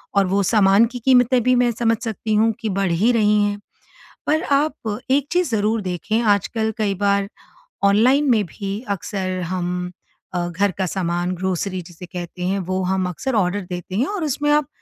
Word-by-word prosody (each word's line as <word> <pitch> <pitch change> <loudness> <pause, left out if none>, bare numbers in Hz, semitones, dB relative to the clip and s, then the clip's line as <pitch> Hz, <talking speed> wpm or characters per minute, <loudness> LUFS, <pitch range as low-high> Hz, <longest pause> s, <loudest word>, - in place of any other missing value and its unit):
और 200 -1 +4
वो 195 +2 +1
सामान 200 +1 +4
की 245 - -5
कीमतें 250 -1 +4
भी 255 +1 +3
मैं 245 -1 +3
समझ 230 0 +1
सकती 220 -1 -3
हूँ 220 +2 +4
कि 220 - -3
बढ़ 195 -2 0
ही 205 +9 +3
रही 210 -2 +3
हैं। 205 0 -1 0.7
पर 315 +3 +2
आप 280 - 0
एक 280 +1 +2
चीज़ 355 -4 +1
ज़रूर 215 +1 +1
देखें 190 +4 -1
आजकल 220 +1 +1
कई 210 -2 0
बार, 200 0 +1 0.5
ऑनलाइन 250 +9 +4
में 215 -4 +3
भी 195 +4 -5
अक्सर 190 -1 -3
हम 180 0 -3 0.4
अ, 175 -1 -1
घर 195 +4 0
का 190 - +1
सामान 175 -1 -1
ग्रोसरी 185 +1 -2
जिसे 175 +1 -11
कहते 175 0 -7
हैं 195 +2 0
वो 185 0 -2
हम 185 0 0
अक्सर 255 - -3
ऑर्डर 200 0 +1
देते 180 +1 -6
हैं 245 +8 +1
और 405 -4 -3
उसमें 295 0 -1
आप 295 -2 +3
205 Hz, 185 wpm, -21 LUFS, 185-235 Hz, 0.7 s, और